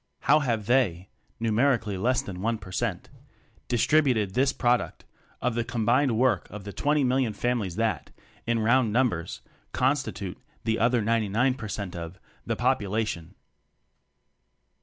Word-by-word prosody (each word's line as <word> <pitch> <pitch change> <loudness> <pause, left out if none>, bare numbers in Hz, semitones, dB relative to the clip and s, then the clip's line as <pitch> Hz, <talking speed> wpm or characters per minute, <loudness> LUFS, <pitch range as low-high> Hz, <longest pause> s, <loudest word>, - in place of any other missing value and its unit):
How 150 +4 +5
have 115 -7 -1
they 100 -7 +1 0.3
(numerically 115 -1 +1
less 120 +7 +1
than 90 -2 -7
one 115 +2 0
per 95 -3 -12
cent) 90 -1 -3 0.6
distributed 120 -5 +2
this 135 +2 +3
product 120 0 0 0.4
of 125 -1 +1
the 120 +1 0
combined 120 +2 +1
work 130 +2 +2
of 105 -1 -8
the 100 0 -7
twenty 145 0 +1
million 130 -3 +1
families 115 -7 -1
that, 115 0 -1 0.4
in 115 0 +2
round 120 0 +3
numbers, 110 -9 0 0.3
constitute - - -1 0.2
(the 115 0 0
other 120 0 +2
ninety 115 -1 +1
nine 125 +6 +2
per 120 -4 -7
cent 100 -3 -5
of 85 +1 -7 0.3
)the - - 0
population? 100 -5 -1
115 Hz, 140 wpm, -27 LUFS, 105-125 Hz, 0.6 s, How